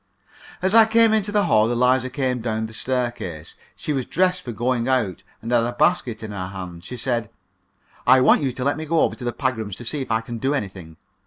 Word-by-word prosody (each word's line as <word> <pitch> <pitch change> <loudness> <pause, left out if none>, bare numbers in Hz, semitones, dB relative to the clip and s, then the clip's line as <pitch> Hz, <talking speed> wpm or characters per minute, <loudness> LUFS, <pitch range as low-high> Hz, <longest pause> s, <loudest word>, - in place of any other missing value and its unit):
As 190 +2 +2
I 225 -1 +8
came 225 0 +5
into 210 -1 +1
the 205 -1 +2
hall, 110 +1 +3
Eliza 125 +1 +2
came 130 -3 -1
down 110 -1 -2
the 110 - -9
staircase. 120 -11 -3 0.2
She 150 - -3
was 130 -3 -2
dressed 180 0 +1
for 120 - -6
going 120 +1 -1
out, 110 -8 0 0.2
and 115 - -4
had 120 -1 +4
a 120 +1 -2
basket 120 -6 +1
in 110 - -6
her 95 -2 -4
hand. 90 -3 -8
She 125 +6 -7
said: 120 -3 -1 0.8
"I 130 +1 +7
want 130 - +5
you 135 -3 0
to 125 +1 -5
let 140 +3 0
me 160 - -5
go 165 +1 +2
over - - +2
to - - -10
the 120 - -1
Pagrams 110 -6 -2
to 120 - -9
see 145 +4 -3
if 130 - -6
I 110 0 +1
can 115 0 -7
do 135 +5 0
anything. 95 - -6
120 Hz, 235 wpm, -22 LUFS, 110-135 Hz, 0.8 s, I